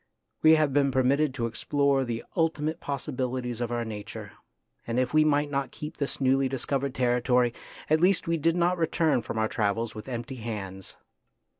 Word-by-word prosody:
We 160 0 +7
have 155 -3 +2
been 140 -1 +3
permitted 135 +3 +2
to 120 -4 -1
explore 140 +4 +1
the 115 -2 -4
ultimate 160 -1 0
possibilities 125 -3 -3
of 120 -1 -2
our 120 -1 -1
nature, 105 -2 -7 0.6
and 115 +1 -2
if 130 +1 0
we 155 0 +6
might 145 -1 +2
not 140 -1 -1
keep 150 +1 -8
this 140 - -2
newly 135 0 +2
discovered 135 +1 -2
territory, 125 -1 +2 0.3
at 155 +1 +3
least 185 0 +3
we 165 0 +1
did 165 +2 +1
not 175 +1 +1
return 160 -4 +2
from 110 - -5
our 110 0 +2
travels 110 +2 -1
with 110 +4 -8
empty 120 +1 -5
hands. 100 -5 -6
135 Hz, 175 wpm, -27 LUFS, 120-150 Hz, 0.6 s, We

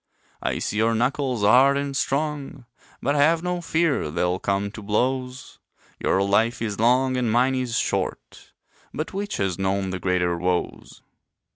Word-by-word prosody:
I - - -1
see 105 - -3
your 115 +1 +2
knuckles 125 -1 0
hard 130 +6 +5
and 140 -1 -3
strong, 140 -1 -2 0.4
But 140 - +1
have 160 +3 +3
no 180 0 -2
fear 165 - 0
they'll 90 +3 -1
come 100 +1 -1
to 110 - -9
blows; 125 +4 -2 0.4
Your 95 - +1
life 110 +4 +2
is 105 -3 -3
long, 130 +3 +3
and 120 -3 0
mine 125 +3 +3
is 125 -3 -1
short, - - -3 0.4
But 155 +4 -4
which 205 +2 -3
has 95 -2 -1
known 95 0 -1
the 95 - -4
greater 90 -1 0
woes? 90 0 -3
120 Hz, 155 wpm, -24 LUFS, 100-140 Hz, 0.4 s, hard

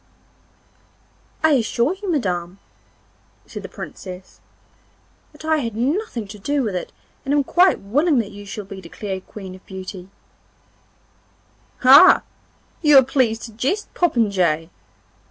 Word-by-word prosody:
'I 315 - +5
assure 240 +5 0
you, 405 - -4
Madam,' 180 - -2 0.9
said - - -8
the - - -9
Princess, 185 -1 -10 0.9
'that 300 +1 -13
I 315 0 +2
had 230 -7 -3
nothing 255 - -2
to 210 0 -10
do 285 +6 -1
with 210 -5 -2
it 180 - -4 0.3
and 280 +2 0
am 290 - +3
quite 355 +6 +3
willing 285 - +1
that 225 -4 -1
you 205 0 -10
shall 205 +1 -7
be 195 -1 -9
declared 190 +2 -7
Queen 190 -3 -9
of 185 - -14
Beauty 190 -1 -8 1.7
'Ah! 275 +8 +8 0.6
you 300 -4 +6
are 265 - +8
pleased 245 -4 0
to 230 - -8
jest, 275 - -2
popinjay! 190 - +1
225 Hz, 135 wpm, -21 LUFS, 190-285 Hz, 1.7 s, Ah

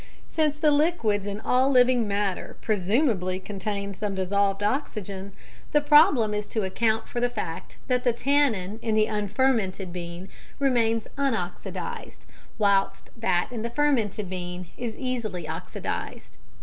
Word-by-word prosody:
Since 305 -2 +1
the 300 0 +3
liquids 285 - +2
in 200 +1 -3
all 255 +3 +3
living 250 -3 +4
matter 200 -2 -2
presumably 205 - +1
contain 200 0 -4
some 200 0 -3
dissolved 195 +1 +1
oxygen, 205 -5 -2 0.4
the 295 - +6
problem 290 - +5
is 210 0 -2
to 220 - -2
account 220 +4 0
for 240 - -3
the 245 0 +2
fact 165 -8 -5
that 250 -1 +1
the 245 - +4
tannin 235 -6 +1
in 220 -2 0
the 215 0 +4
unfermented 210 -3 0
bean 175 +1 -6 0.3
remains 230 -5 +2
unoxidised, 225 -11 -3 0.3
whilst 200 -2 +1
that 225 -7 +1
in 235 -3 -4
the 235 - -2
fermented 235 -7 +1
bean 180 0 -5
is 235 -2 -4
easily 225 - -3
oxidised. 160 +1 -5
215 Hz, 135 wpm, -26 LUFS, 195-250 Hz, 0.4 s, the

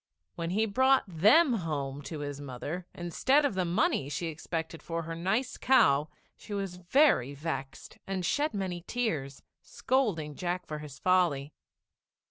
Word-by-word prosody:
] - - -56
When 165 0 -3
he 215 +5 +1
brought 260 +5 +3
them 215 - +5
home 145 -4 -3
to 155 -3 -5
his 145 -1 -5
mother 145 +6 -6
instead 260 - +2
of 280 - +1
the 185 -1 0
money 170 -5 +1
she 150 +4 -3
expected 160 +1 -5
for 165 0 -4
her 165 +1 -5
nice 195 +10 -1
cow, 150 - +4 0.3
she 205 - -7
was 195 -3 -4
very 175 - +3
vexed 140 -2 -6
and 190 -2 -2
shed 295 - 0
many 185 -3 -3
tears, 155 - -2 0.2
scolding 205 - -1
Jack 180 +3 -3
for 150 -1 -5
his 150 -2 -9
folly. 170 -6 +2
175 Hz, 155 wpm, -30 LUFS, 150-200 Hz, 0.3 s, them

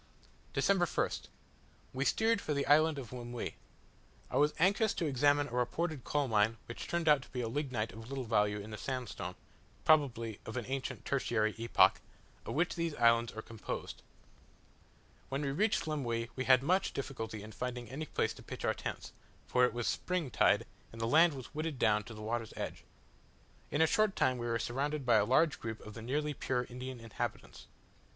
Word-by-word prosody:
December 195 -3 +3
1st. - - -1 0.7
We 135 +1 -1
steered 225 +4 +2
for 150 - -2
the 140 - 0
island 155 +1 +5
of 130 -3 -7
Lemuy. 120 -1 -5 0.8
I - - -3
was 150 +1 +3
anxious 200 +5 +3
to 170 - -1
examine 145 +1 +3
a - - -12
reported 135 +4 -1
coal 145 -2 0
mine 110 0 +2
which 120 - -7
turned 170 -1 -1
out 150 -3 +6
to - - -14
be 125 -3 -3
lignite 120 -3 -2
of 115 +2 -10
little 135 -1 -3
value, 105 -3 +2
in 105 +2 -8
the 105 - -6
sandstone 120 -9 -4 0.5
(probably 115 -8 +3
of 110 - -6
an 120 - -2
ancient 135 0 -4
tertiary 110 -5 +1
epoch) 115 0 +4 0.5
of - - -3
which 165 +4 +2
these 165 -2 -2
islands 115 -1 +4
are 110 - -6
composed. 115 -2 -6 1.3
When 135 +2 -2
we 140 - 0
reached 205 +8 +1
Lemuy 120 -7 -2
we 130 - -2
had 130 0 +6
much 185 +6 +2
difficulty 110 -6 -5
in 110 - -9
finding 125 +1 -4
any 145 +7 -5
place - - 0
to - - -13
pitch - - -6
our - - +3
tents, - - -6 0.3
for 125 0 +4
it - - 0
was 120 -1 -3
spring 180 -7 -1
tide, - - +4 0.3
and 115 - -10
the 115 - 0
land 160 +7 +5
was 130 -8 -9
wooded 155 -1 -3
down 105 -3 +2
to 115 - -9
the 105 - -8
water's 115 +1 -3
edge. - - -5 0.8
In 150 - +3
a - - +6
short 215 +5 +2
time 130 -1 +2
we 120 - -3
were 115 0 +1
surrounded 140 +4 -2
by 120 -3 +5
a 105 - +4
large 150 +6 +3
group 110 -1 -5
of 105 - -8
the 110 - -8
nearly 150 +6 -1
pure 125 -2 -1
Indian 125 +1 -7
inhabitants. 115 -2 -5
130 Hz, 190 wpm, -33 LUFS, 115-150 Hz, 1.3 s, out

